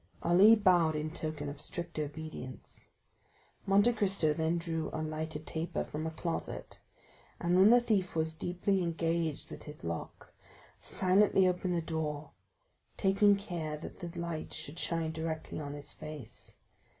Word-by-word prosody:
Ali 190 Hz, +6 st, +7 dB
bowed 175 Hz, -6 st, +4 dB
in 155 Hz, +1 st, -2 dB
token 155 Hz, -2 st, -4 dB
of 145 Hz, 0 st, -6 dB
strict 170 Hz, 0 st, -5 dB
obedience. 150 Hz, -4 st, -7 dB, 0.8 s
Monte 205 Hz, +5 st, +5 dB
Cristo 195 Hz, -8 st, +2 dB
then 160 Hz, +2 st, +1 dB
drew 165 Hz, -2 st, -2 dB
a -, -, -4 dB
lighted 155 Hz, 0 st, -4 dB
taper 165 Hz, +2 st, -2 dB
from 155 Hz, +2 st, -4 dB
a -, -, 0 dB
closet, 165 Hz, +1 st, -4 dB, 0.6 s
and 175 Hz, +1 st, +2 dB
when 190 Hz, +3 st, +7 dB
the 245 Hz, +1 st, +8 dB
thief 210 Hz, -8 st, 0 dB
was 160 Hz, 0 st, 0 dB
deeply 180 Hz, +4 st, 0 dB
engaged 165 Hz, -2 st, -1 dB
with -, -, -9 dB
his 150 Hz, 0 st, -10 dB
lock, 85 Hz, 0 st, -6 dB, 0.5 s
silently 190 Hz, 0 st, +4 dB
opened 180 Hz, 0 st, 0 dB
the 170 Hz, -, 0 dB
door, 155 Hz, -2 st, -3 dB, 0.7 s
taking 200 Hz, +1 st, +5 dB
care 170 Hz, -7 st, -4 dB
that 155 Hz, -, -9 dB
the 175 Hz, -1 st, -6 dB
light 170 Hz, -2 st, -4 dB
should 155 Hz, +4 st, -5 dB
shine 165 Hz, -1 st, 0 dB
directly 160 Hz, -1 st, -4 dB
on 145 Hz, -2 st, -5 dB
his 145 Hz, 0 st, -4 dB
face. 140 Hz, -6 st, -8 dB
165 Hz, 150 wpm, -32 LUFS, 155-185 Hz, 0.8 s, the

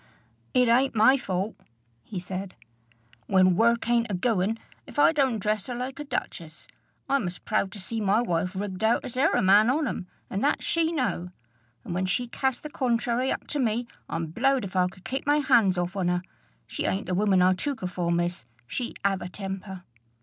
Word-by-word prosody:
"It 250 Hz, -1 st, +5 dB
ain't 255 Hz, +2 st, +3 dB
my 220 Hz, +5 st, +6 dB
fault," 195 Hz, -4 st, -2 dB, 0.5 s
he 185 Hz, -, -6 dB
said, 185 Hz, +1 st, -6 dB, 0.7 s
"when 185 Hz, -1 st, +4 dB
work 235 Hz, +3 st, +3 dB
ain't 235 Hz, -1 st, +2 dB
a 200 Hz, -, -1 dB
goin,' 210 Hz, +1 st, +1 dB, 0.3 s
if -, -, -12 dB
I 290 Hz, +2 st, +6 dB
don't 270 Hz, -7 st, +1 dB
dress 210 Hz, 0 st, -1 dB
her 245 Hz, -, -4 dB
like 255 Hz, +3 st, -5 dB
a -, -, -3 dB
duchess. 175 Hz, -, -5 dB, 0.4 s
I'm 275 Hz, -8 st, +1 dB
as 180 Hz, +1 st, -5 dB
proud 190 Hz, -, -1 dB
to 210 Hz, -, -8 dB
see 220 Hz, +4 st, -4 dB
my 205 Hz, +1 st, +3 dB
wife 180 Hz, -4 st, -1 dB
rigged 190 Hz, 0 st, -4 dB
out 225 Hz, +2 st, +2 dB
as 245 Hz, -, -6 dB
e'er 260 Hz, -, +3 dB
a -, -, +2 dB
man 205 Hz, +4 st, +6 dB
on 295 Hz, +3 st, +1 dB
'em; 185 Hz, -, -4 dB, 0.2 s
and 195 Hz, -, -3 dB
that 290 Hz, -, +1 dB
she 330 Hz, -1 st, +1 dB
know! 250 Hz, -, -1 dB, 0.5 s
and -, -, -5 dB
when 185 Hz, +1 st, 0 dB
she 245 Hz, +6 st, 0 dB
cast 265 Hz, +1 st, -2 dB
the 300 Hz, -, -5 dB
contrairy 245 Hz, 0 st, 0 dB
up -, -, -3 dB
to 295 Hz, -, -2 dB
me, 240 Hz, -1 st, 0 dB, 0.2 s
I'm 165 Hz, 0 st, -2 dB
blowed 255 Hz, -, +1 dB
if 190 Hz, -, -8 dB
I 180 Hz, -1 st, +3 dB
could 185 Hz, 0 st, -13 dB
keep 270 Hz, +2 st, -4 dB
my 290 Hz, +1 st, +4 dB
hands 240 Hz, -10 st, +4 dB
off 175 Hz, +2 st, -2 dB
on 190 Hz, -3 st, 0 dB
her. 175 Hz, 0 st, 0 dB, 0.4 s
She -, -, -4 dB
ain't 190 Hz, -, -1 dB
the 180 Hz, -, -2 dB
woman 190 Hz, -1 st, +3 dB
I 185 Hz, +1 st, +5 dB
took 275 Hz, +9 st, -3 dB
her 185 Hz, -, -1 dB
for, 180 Hz, -1 st, -2 dB
miss. 175 Hz, -4 st, -1 dB, 0.2 s
She 235 Hz, -, -4 dB
'ave 195 Hz, -1 st, +1 dB
a -, -, -6 dB
temper!" 190 Hz, -1 st, -6 dB
210 Hz, 210 wpm, -26 LUFS, 185-250 Hz, 0.7 s, my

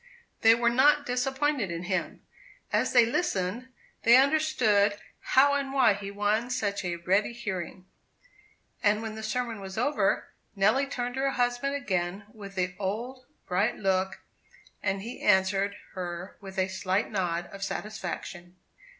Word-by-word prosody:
They 225 Hz, 0 st, +7 dB
were 235 Hz, 0 st, +2 dB
not 290 Hz, +4 st, +4 dB
disappointed 265 Hz, -2 st, 0 dB
in 170 Hz, 0 st, -4 dB
him. 185 Hz, +1 st, -3 dB, 0.5 s
As -, -, +2 dB
they 240 Hz, -2 st, +6 dB
listened, 230 Hz, -, -1 dB, 0.3 s
they 235 Hz, +2 st, +7 dB
understood 260 Hz, -9 st, +3 dB, 0.4 s
how 280 Hz, +2 st, +6 dB
and 280 Hz, -1 st, -1 dB
why 265 Hz, -5 st, +4 dB
he 200 Hz, 0 st, -6 dB
won 210 Hz, +4 st, 0 dB
such 205 Hz, -6 st, -1 dB
a 175 Hz, -1 st, -2 dB
ready 190 Hz, +6 st, +1 dB
hearing; 185 Hz, -5 st, -5 dB, 1.0 s
and 210 Hz, +1 st, +2 dB
when 220 Hz, -1 st, -4 dB
the 220 Hz, -, -7 dB
sermon 225 Hz, 0 st, -3 dB
was 190 Hz, 0 st, -8 dB
over, 285 Hz, +6 st, +1 dB, 0.3 s
Nelly 215 Hz, +8 st, +3 dB
turned 245 Hz, -3 st, -3 dB
to 265 Hz, -, -3 dB
her 275 Hz, -, +2 dB
husband 245 Hz, +2 st, 0 dB
again 190 Hz, -6 st, -2 dB
with 200 Hz, -2 st, -10 dB
the 180 Hz, -1 st, -1 dB
old 240 Hz, +6 st, -4 dB, 0.2 s
bright 185 Hz, +3 st, +1 dB
look; 190 Hz, -1 st, 0 dB, 0.6 s
and 195 Hz, 0 st, -1 dB
he 235 Hz, +3 st, -7 dB
answered 195 Hz, 0 st, +2 dB, 0.2 s
her 175 Hz, 0 st, -6 dB
with 195 Hz, -1 st, -10 dB
a 190 Hz, 0 st, +2 dB
slight 190 Hz, +1 st, -1 dB
nod 175 Hz, -4 st, -1 dB
of 195 Hz, 0 st, -7 dB
satisfaction. 175 Hz, -4 st, -5 dB
210 Hz, 150 wpm, -28 LUFS, 190-250 Hz, 1.0 s, They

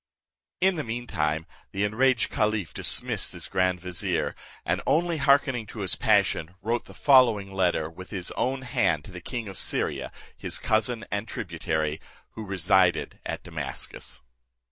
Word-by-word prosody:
In 190 Hz, -1 st, +3 dB
the 155 Hz, -, -1 dB
mean 120 Hz, 0 st, -4 dB
time, 80 Hz, -6 st, -1 dB, 0.3 s
the 100 Hz, -, 0 dB
enraged 120 Hz, +4 st, +2 dB
caliph 105 Hz, -8 st, 0 dB
dismissed -, -, +1 dB
his -, -, -4 dB
grand 95 Hz, -1 st, +1 dB
vizier, 90 Hz, -1 st, -1 dB, 0.3 s
and -, -, 0 dB
only 170 Hz, 0 st, +2 dB
hearkening 140 Hz, -5 st, +3 dB
to 110 Hz, -, -7 dB
his 95 Hz, -, +1 dB
passion, 100 Hz, -6 st, +2 dB
wrote 115 Hz, +3 st, -1 dB
the -, -, -14 dB
following 115 Hz, -8 st, +5 dB
letter 90 Hz, -4 st, +1 dB
with 95 Hz, +3 st, -11 dB
his 90 Hz, -3 st, -4 dB
own 130 Hz, +1 st, -1 dB
hand 95 Hz, -, +1 dB
to -, -, -10 dB
the 90 Hz, -1 st, -8 dB
king 120 Hz, +4 st, -4 dB
of 95 Hz, -2 st, -7 dB
Syria, -, -, -1 dB, 0.2 s
his -, -, -2 dB
cousin 110 Hz, +1 st, +1 dB
and 100 Hz, +2 st, -2 dB
tributary, 80 Hz, -6 st, -2 dB, 0.3 s
who 110 Hz, -, -7 dB
resided 95 Hz, -2 st, +2 dB
at -, -, -4 dB
Damascus. -, -, -4 dB
100 Hz, 155 wpm, -27 LUFS, 90-120 Hz, 0.3 s, following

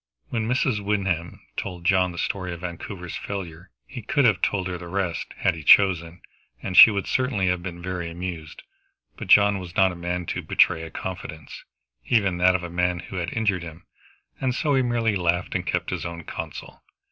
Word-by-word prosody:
When 110 Hz, -2 st, -2 dB
Mrs. 125 Hz, -2 st, +1 dB
Wyndham 95 Hz, -5 st, -1 dB, 0.2 s
told 90 Hz, -3 st, -5 dB
John 90 Hz, -1 st, +3 dB
the 85 Hz, -, -10 dB
story 90 Hz, +1 st, -2 dB
of 85 Hz, -, -9 dB
Vancouver's 90 Hz, 0 st, -6 dB
failure 90 Hz, -3 st, -6 dB, 0.2 s
he 125 Hz, -2 st, -8 dB
could 140 Hz, +5 st, +1 dB
have 105 Hz, -6 st, +3 dB
told 95 Hz, -2 st, 0 dB
her 90 Hz, -1 st, -4 dB
the 85 Hz, -, -9 dB
rest, 95 Hz, -2 st, -3 dB
had -, -, +2 dB
he 80 Hz, -, -8 dB
chosen, 85 Hz, -1 st, +4 dB, 0.4 s
and 95 Hz, -, -5 dB
she 115 Hz, -, +11 dB
would 100 Hz, -3 st, -2 dB
certainly 125 Hz, -7 st, 0 dB
have 90 Hz, -1 st, 0 dB
been 85 Hz, -1 st, -7 dB
very 90 Hz, -2 st, -4 dB
much 85 Hz, -, -7 dB
amused. 85 Hz, -3 st, -6 dB, 0.5 s
But 110 Hz, -, -8 dB
John 100 Hz, +1 st, +5 dB
was 90 Hz, -1 st, -9 dB
not 95 Hz, -2 st, +4 dB
a -, -, -8 dB
man 85 Hz, +1 st, -3 dB
to -, -, -3 dB
betray 80 Hz, -, +3 dB
a 80 Hz, -, -7 dB
confidence, 80 Hz, -6 st, -7 dB, 0.4 s
even 100 Hz, -7 st, +2 dB
that 90 Hz, +1 st, +5 dB
of 90 Hz, -, -2 dB
a 90 Hz, -, -5 dB
man 90 Hz, 0 st, 0 dB
who 95 Hz, +2 st, -8 dB
had 90 Hz, +1 st, -2 dB
injured 105 Hz, -5 st, 0 dB
him, 85 Hz, 0 st, -10 dB, 0.5 s
and 130 Hz, -2 st, -1 dB
so 150 Hz, 0 st, 0 dB
he 135 Hz, -, +3 dB
merely 120 Hz, -3 st, 0 dB
laughed 90 Hz, -1 st, 0 dB
and -, -, -3 dB
kept -, -, -1 dB
his -, -, -3 dB
own 85 Hz, -1 st, -6 dB
counsel. 80 Hz, -2 st, -8 dB
90 Hz, 205 wpm, -24 LUFS, 85-100 Hz, 0.5 s, she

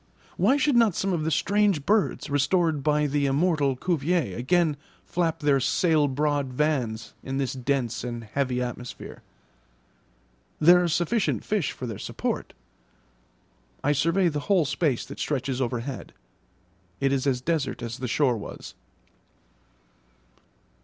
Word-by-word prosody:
Why 220 Hz, +10 st, +3 dB
should 290 Hz, -1 st, +2 dB
not 230 Hz, -6 st, +4 dB
some 195 Hz, -1 st, 0 dB
of 160 Hz, -3 st, -1 dB
the -, -, +1 dB
strange 190 Hz, 0 st, +1 dB
birds 210 Hz, 0 st, +1 dB
restored 155 Hz, +2 st, +1 dB
by 150 Hz, +1 st, +2 dB
the 145 Hz, 0 st, +1 dB
immortal 145 Hz, -1 st, +2 dB
Cuvier 160 Hz, -, 0 dB
again 155 Hz, +5 st, +2 dB, 0.3 s
flap 165 Hz, -2 st, -1 dB
their 145 Hz, -2 st, +3 dB
'sail 155 Hz, +2 st, +2 dB
broad 145 Hz, 0 st, 0 dB
vans' 125 Hz, -6 st, -1 dB
in 135 Hz, 0 st, -4 dB
this 135 Hz, -2 st, -1 dB
dense 130 Hz, -3 st, -1 dB
and 120 Hz, -1 st, -5 dB
heavy 125 Hz, +2 st, -1 dB
atmosphere? 125 Hz, 0 st, -7 dB, 1.4 s
There 175 Hz, +3 st, +7 dB
are 175 Hz, -, +1 dB
sufficient 175 Hz, +7 st, 0 dB
fish 205 Hz, -7 st, 0 dB
for 130 Hz, -, -7 dB
their 110 Hz, -5 st, -6 dB
support. -, -, -4 dB, 1.3 s
I 145 Hz, -, +3 dB
survey 165 Hz, +6 st, +2 dB
the 150 Hz, -3 st, -1 dB
whole 185 Hz, -6 st, +4 dB
space 145 Hz, -2 st, 0 dB
that 140 Hz, -, -10 dB
stretches 135 Hz, -2 st, -2 dB
overhead; 125 Hz, +1 st, -4 dB, 0.9 s
it 135 Hz, 0 st, +1 dB
is 135 Hz, 0 st, 0 dB
as 130 Hz, -2 st, +1 dB
desert 150 Hz, -2 st, -2 dB
as 120 Hz, +1 st, -5 dB
the 125 Hz, -, -3 dB
shore 125 Hz, -1 st, +2 dB
was. 105 Hz, -, -9 dB
145 Hz, 140 wpm, -26 LUFS, 130-170 Hz, 1.4 s, There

